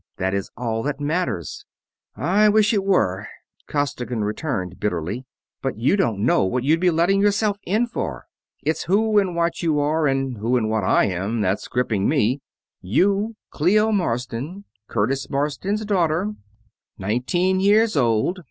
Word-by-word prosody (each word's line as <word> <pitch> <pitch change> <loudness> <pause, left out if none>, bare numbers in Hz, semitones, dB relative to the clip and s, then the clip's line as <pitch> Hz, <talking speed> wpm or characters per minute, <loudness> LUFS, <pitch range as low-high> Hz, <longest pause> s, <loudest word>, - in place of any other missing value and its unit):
That 95 +1 -1
is 100 -1 -2
all 115 -2 -2
that 140 +2 -3
matters." 150 - -2 0.5
"I 210 +4 +3
wish 215 +1 +4
it 200 -2 +1
were," 105 - +1 0.4
Costigan 125 -6 -2
returned 105 - -3
bitterly, 105 +5 -2 0.4
"but 135 -5 -3
you 120 - +2
don't 115 - 0
know 125 - +3
what 120 +7 -1
you'd 155 +4 +3
be 180 +1 +3
letting 175 +4 +2
yourself 205 0 +2
in 215 +6 +2
for. 235 - -5 0.4
It's 160 - -1
who 210 +3 +3
and 185 -3 -1
what 170 0 0
you 155 -3 +1
are 150 +1 +1
and 135 -2 -1
who 120 +4 +1
and 110 -2 0
what 110 -2 0
I - - +3
am 100 +5 -2
that's 95 0 -1
griping 115 -5 0
me. 135 -2 +1 0.4
You, 200 - +1 0.2
Clio 210 +8 +3
Marsden, 145 - -2 0.2
Curtis 135 +5 -1
Marsden's 150 +10 -1
daughter. 185 0 +1 0.6
Nineteen 175 - 0
years 210 +2 +3
old. 120 - +1
145 Hz, 150 wpm, -22 LUFS, -, 0.6 s, wish